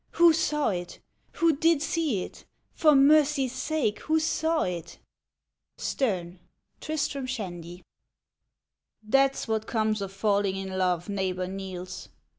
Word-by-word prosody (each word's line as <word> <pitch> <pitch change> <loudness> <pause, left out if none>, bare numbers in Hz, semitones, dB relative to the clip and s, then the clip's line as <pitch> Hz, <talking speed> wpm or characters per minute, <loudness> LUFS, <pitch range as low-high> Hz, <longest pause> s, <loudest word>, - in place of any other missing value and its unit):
— - - -45
Who 340 -1 +8
saw 300 -2 +1
it? 175 -3 -4 0.4
Who 330 -2 +2
did 325 +1 +3
see 305 - 0
it - - -9
• - - -16 0.3
For 305 -3 +4
mercy's 280 -2 +4
sake, 280 -11 -1
who 315 +1 +1
saw 320 0 0
it? 170 -2 -5 0.8
STERXE: 185 -8 -2 0.4
Tristram 285 -4 -3
Shandy. 175 -8 -6 1.3
T - - +4
HAT'S 275 -2 +1
what 220 -1 -1
comes 215 -2 0
of 195 -1 -4
falling 200 -1 +1
in 190 -1 -5
love, 180 -2 0
Neighbor 190 -2 -2
Niels. 185 -1 -7
220 Hz, 135 wpm, -27 LUFS, 185-300 Hz, 1.3 s, Who